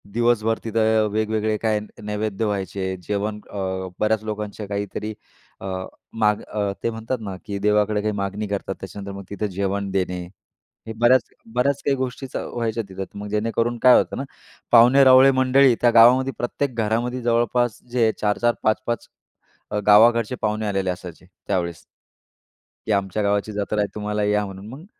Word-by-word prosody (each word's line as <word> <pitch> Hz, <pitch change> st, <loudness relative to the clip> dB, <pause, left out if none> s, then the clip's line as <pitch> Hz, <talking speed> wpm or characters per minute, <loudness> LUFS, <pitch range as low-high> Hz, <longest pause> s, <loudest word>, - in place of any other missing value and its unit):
दिवसभर 115 Hz, 0 st, +1 dB
तिथं 110 Hz, -1 st, +2 dB
वेगवेगळे 110 Hz, 0 st, 0 dB
काय 110 Hz, -1 st, 0 dB
न 105 Hz, -, -9 dB, 0.2 s
नैवेद्य 105 Hz, 0 st, -2 dB
व्हायचे, 95 Hz, -2 st, -2 dB
जेवण 105 Hz, +3 st, -3 dB
अ, -, -, -8 dB, 0.4 s
बऱ्याच 110 Hz, 0 st, +1 dB
लोकांच्या 105 Hz, -1 st, -5 dB
काहीतरी 105 Hz, +1 st, -4 dB, 0.5 s
अ, -, -, -7 dB, 0.5 s
माग 105 Hz, -2 st, +1 dB
अ, 105 Hz, -2 st, -2 dB
ते -, -, +1 dB
म्हणतात 115 Hz, +3 st, -4 dB
ना 100 Hz, -3 st, -5 dB
की 100 Hz, -2 st, -4 dB
देवाकडे 105 Hz, 0 st, +2 dB
काही 105 Hz, +1 st, -1 dB
मागणी 100 Hz, +1 st, -3 dB
करतात. 100 Hz, -1 st, -3 dB
त्याच्यानंतर 100 Hz, +1 st, -7 dB
मग 100 Hz, -, -8 dB
तिथं 100 Hz, +1 st, -3 dB
जेवण 100 Hz, +1 st, -1 dB
देणे. 90 Hz, -2 st, -1 dB, 0.7 s
हे 110 Hz, -, -5 dB
बऱ्याच 120 Hz, +1 st, +5 dB, 0.3 s
बऱ्याच 140 Hz, +3 st, +1 dB
काही 140 Hz, -, +2 dB
गोष्टी 130 Hz, +1 st, -4 dB
व्हायच्या 115 Hz, -1 st, -2 dB
तिथं. 95 Hz, 0 st, -5 dB, 0.2 s
मग 105 Hz, -, -6 dB
जेणेकरून 115 Hz, +3 st, -1 dB
काय 125 Hz, -1 st, +8 dB
होतं -, -, 0 dB
ना, 135 Hz, -, -3 dB, 0.5 s
पाहुणे 125 Hz, +4 st, +7 dB
रावळे 130 Hz, +1 st, +7 dB
मंडळी 130 Hz, 0 st, +4 dB
त्या 120 Hz, -, +5 dB
गावामध्ये 125 Hz, +3 st, +6 dB
प्रत्येक 125 Hz, +1 st, -2 dB
घरामध्ये 120 Hz, +3 st, -1 dB
जवळपास 120 Hz, 0 st, +1 dB
जे 115 Hz, -3 st, +3 dB
4-4-5-5 115 Hz, +2 st, 0 dB, 0.6 s
अ, 105 Hz, -, 0 dB
गावाकडचे 115 Hz, +3 st, +5 dB
पाहुणे 110 Hz, 0 st, -1 dB
आलेले 95 Hz, -2 st, -1 dB
असायचे 90 Hz, -2 st, -7 dB, 0.2 s
त्यावेळेस. 85 Hz, -4 st, -2 dB, 1.1 s
की 110 Hz, -, -1 dB
आमच्या 100 Hz, +1 st, 0 dB
गावाची 100 Hz, +1 st, 0 dB
जात्रा 105 Hz, +1 st, -2 dB
आहे 100 Hz, -, 0 dB
तुम्हाला 105 Hz, 0 st, -2 dB
या 105 Hz, 0 st, +1 dB
म्हणून. 95 Hz, +1 st, -9 dB
मग 140 Hz, +8 st, -10 dB
110 Hz, 155 wpm, -22 LUFS, 100-120 Hz, 1.1 s, काय